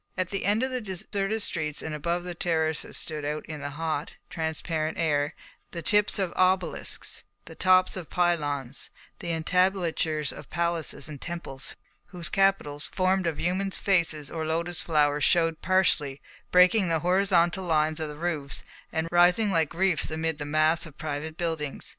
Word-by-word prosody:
At 185 Hz, -1 st, -1 dB
the 195 Hz, -, -2 dB
end 210 Hz, +4 st, +2 dB
of 260 Hz, -, -1 dB
the 255 Hz, -1 st, -2 dB
deserted 200 Hz, +2 st, -2 dB
streets 155 Hz, -5 st, -2 dB
and 160 Hz, -, -4 dB
above 170 Hz, +4 st, -1 dB
the 180 Hz, 0 st, -5 dB
terraces 160 Hz, -2 st, -1 dB
stood 155 Hz, -2 st, -3 dB
out 150 Hz, +1 st, -3 dB
in 155 Hz, -2 st, -7 dB
the 145 Hz, -, -3 dB
hot, 155 Hz, 0 st, -3 dB, 0.2 s
transparent 160 Hz, 0 st, -2 dB
air 150 Hz, -2 st, +1 dB, 0.4 s
the 170 Hz, -1 st, -5 dB
tips 210 Hz, 0 st, +3 dB
of 190 Hz, -3 st, -1 dB
obelisks, 185 Hz, 0 st, +1 dB, 0.2 s
the -, -, -10 dB
tops 185 Hz, 0 st, +4 dB
of 180 Hz, -4 st, -7 dB
pylons, 145 Hz, -7 st, 0 dB, 0.3 s
the 170 Hz, -, -3 dB
entablatures 165 Hz, -2 st, +1 dB
of -, -, -11 dB
palaces 170 Hz, -4 st, -1 dB
and 150 Hz, -3 st, -8 dB
temples, 170 Hz, -6 st, -5 dB, 0.3 s
whose 175 Hz, -2 st, -4 dB
capitals, 195 Hz, -7 st, +1 dB
formed 185 Hz, -1 st, +1 dB
of 155 Hz, -3 st, -2 dB
human 185 Hz, +3 st, 0 dB
faces 170 Hz, -7 st, +1 dB
or 160 Hz, -1 st, -3 dB
lotus 165 Hz, +2 st, -1 dB
flowers, 150 Hz, -2 st, +2 dB
showed 165 Hz, -1 st, +3 dB
partially, 160 Hz, -7 st, +2 dB, 0.3 s
breaking 180 Hz, +2 st, +5 dB
the 165 Hz, -2 st, +1 dB
horizontal 180 Hz, -1 st, +3 dB
lines 155 Hz, -2 st, +1 dB
of 155 Hz, -1 st, -3 dB
the 150 Hz, -, -7 dB
roofs 155 Hz, -4 st, -3 dB, 0.3 s
and 160 Hz, 0 st, -1 dB
rising 180 Hz, +5 st, +4 dB
like 165 Hz, -5 st, +2 dB
reefs 180 Hz, -1 st, +1 dB
amid 160 Hz, 0 st, -2 dB
the 145 Hz, -, -3 dB
mass 155 Hz, +3 st, +3 dB
of 150 Hz, -, -15 dB
private 155 Hz, 0 st, -4 dB
buildings. 160 Hz, -4 st, -3 dB
165 Hz, 165 wpm, -27 LUFS, 155-185 Hz, 0.4 s, breaking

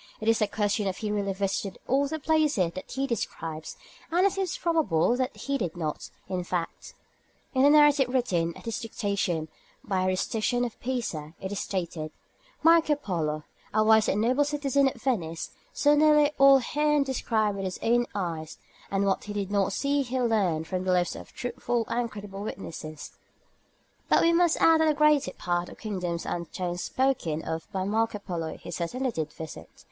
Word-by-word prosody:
It 220 Hz, -, -5 dB
is 225 Hz, -1 st, +3 dB
a 210 Hz, -, +3 dB
question 205 Hz, 0 st, 0 dB
if 190 Hz, -, -2 dB
he 215 Hz, -2 st, -3 dB
really 200 Hz, -1 st, 0 dB
visited 195 Hz, 0 st, -2 dB
all 275 Hz, +2 st, +2 dB
the 315 Hz, +3 st, -3 dB
places 300 Hz, -, +2 dB
that 185 Hz, -, -8 dB
he 270 Hz, +2 st, -1 dB
describes, 165 Hz, -, -4 dB, 0.3 s
and 355 Hz, +3 st, +3 dB
it 395 Hz, -, +4 dB
seems 385 Hz, -3 st, -2 dB
probable 300 Hz, -, +2 dB
that 255 Hz, +1 st, -2 dB
he 280 Hz, -1 st, -2 dB
did 175 Hz, -1 st, -3 dB
not; 155 Hz, -3 st, -4 dB, 0.2 s
in 185 Hz, -1 st, -2 dB
fact, 175 Hz, -1 st, -4 dB, 0.6 s
in 260 Hz, -, +2 dB
the 280 Hz, -, +7 dB
narrative 295 Hz, -3 st, +5 dB
written 175 Hz, -10 st, 0 dB
at -, -, -14 dB
his 230 Hz, -, -2 dB
dictation 200 Hz, -8 st, -2 dB, 0.4 s
by 185 Hz, -1 st, 0 dB
Rusticien 220 Hz, +6 st, 0 dB
of 235 Hz, -, -7 dB
Pisa 175 Hz, -12 st, -3 dB
it 190 Hz, -, -5 dB
is 205 Hz, -, -2 dB
stated 170 Hz, -5 st, -3 dB, 0.5 s
"Marco 325 Hz, -2 st, +5 dB
Polo, 160 Hz, -, -2 dB, 0.3 s
a 215 Hz, -, +5 dB
wise 220 Hz, 0 st, +5 dB
and 205 Hz, -, +1 dB
noble 255 Hz, +5 st, +3 dB
citizen 280 Hz, -2 st, +1 dB
of 260 Hz, -, -3 dB
Venice, 170 Hz, -11 st, -2 dB, 0.2 s
saw 290 Hz, 0 st, +3 dB
nearly 300 Hz, 0 st, +5 dB
all 275 Hz, 0 st, +8 dB
herein 295 Hz, +2 st, +1 dB
described 225 Hz, -6 st, 0 dB
with 195 Hz, -, -3 dB
his 185 Hz, -, -3 dB
own 240 Hz, +1 st, +3 dB
eyes, 165 Hz, -5 st, -4 dB, 0.3 s
and 195 Hz, 0 st, +1 dB
what 195 Hz, -1 st, 0 dB
he 210 Hz, -, -5 dB
did 200 Hz, -1 st, -3 dB
not 200 Hz, -1 st, +2 dB
see 280 Hz, +6 st, +1 dB
he 260 Hz, -1 st, -2 dB
learnt 200 Hz, -10 st, +1 dB
from 185 Hz, +2 st, -3 dB
the 185 Hz, -, +1 dB
lips 175 Hz, -1 st, +1 dB
of -, -, -10 dB
truthful 240 Hz, -1 st, -2 dB
and 240 Hz, 0 st, 0 dB
credible 200 Hz, -2 st, -8 dB
witnesses;" 155 Hz, -7 st, -7 dB, 1.0 s
but -, -, +5 dB
we 335 Hz, -, +4 dB
must 340 Hz, -1 st, +3 dB
add 325 Hz, -1 st, +6 dB
that 320 Hz, -, +4 dB
the 305 Hz, -, +3 dB
greater 300 Hz, -1 st, +4 dB
part 175 Hz, 0 st, -2 dB
of -, -, -11 dB
the -, -, -21 dB
kingdoms 180 Hz, -5 st, -3 dB
and 170 Hz, -1 st, -4 dB
towns 175 Hz, -1 st, -3 dB
spoken 245 Hz, -, 0 dB
of 160 Hz, 0 st, -5 dB
by 190 Hz, -1 st, -2 dB
Marco 220 Hz, +2 st, 0 dB
Polo 170 Hz, -5 st, -5 dB
he -, -, -9 dB
certainly 245 Hz, +11 st, -2 dB
did 160 Hz, -6 st, -3 dB
visit. 160 Hz, 0 st, -9 dB
215 Hz, 190 wpm, -27 LUFS, 180-270 Hz, 1.0 s, all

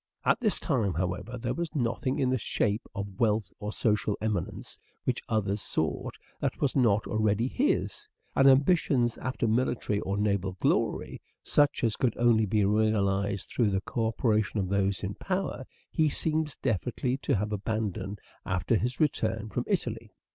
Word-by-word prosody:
At -, -, +3 dB
this 215 Hz, -4 st, +2 dB
time, 115 Hz, -, 0 dB
however, 90 Hz, +8 st, -2 dB
there 120 Hz, +1 st, -2 dB
was 170 Hz, -2 st, -4 dB
nothing 125 Hz, 0 st, 0 dB
in 130 Hz, -2 st, +1 dB
the 130 Hz, -, +2 dB
shape 105 Hz, +1 st, -1 dB
of 100 Hz, -1 st, -5 dB
wealth 105 Hz, -5 st, +1 dB
or 105 Hz, 0 st, -4 dB
social 105 Hz, -2 st, +1 dB
eminence, 105 Hz, -5 st, -3 dB, 0.2 s
which -, -, -1 dB
others 105 Hz, -2 st, 0 dB
sought -, -, -2 dB, 0.2 s
that -, -, -2 dB
was 140 Hz, -, +1 dB
not 115 Hz, -6 st, +3 dB
already 110 Hz, +1 st, +1 dB
his; 295 Hz, -, -1 dB, 0.3 s
and 135 Hz, -, +5 dB
ambitions 135 Hz, -4 st, +3 dB
after 130 Hz, -2 st, -1 dB
military 110 Hz, -2 st, +1 dB
or 100 Hz, 0 st, -2 dB
naval 100 Hz, -2 st, 0 dB
glory, -, -, 0 dB, 0.2 s
such 145 Hz, -2 st, +2 dB
as 115 Hz, -2 st, +2 dB
could 125 Hz, -4 st, 0 dB
only 115 Hz, -2 st, +4 dB
be 105 Hz, 0 st, +2 dB
realized 100 Hz, -2 st, +1 dB
through 115 Hz, -4 st, +2 dB
the 95 Hz, -1 st, 0 dB
co 115 Hz, +2 st, -1 dB
operation 110 Hz, -2 st, +1 dB
of 95 Hz, -2 st, -1 dB
those 100 Hz, -1 st, 0 dB
in 100 Hz, 0 st, -2 dB
power, 185 Hz, -, -3 dB, 0.3 s
he 155 Hz, -1 st, +3 dB
seems 155 Hz, 0 st, -1 dB
definitely 125 Hz, +2 st, 0 dB
to 140 Hz, -, 0 dB
have 105 Hz, +1 st, -1 dB
abandoned 105 Hz, -1 st, -2 dB, 0.3 s
after 95 Hz, +5 st, +1 dB
his 125 Hz, +4 st, -2 dB
return 115 Hz, -8 st, 0 dB
from 120 Hz, +4 st, -2 dB
Italy. 115 Hz, -, -2 dB
110 Hz, 160 wpm, -29 LUFS, 100-130 Hz, 0.3 s, and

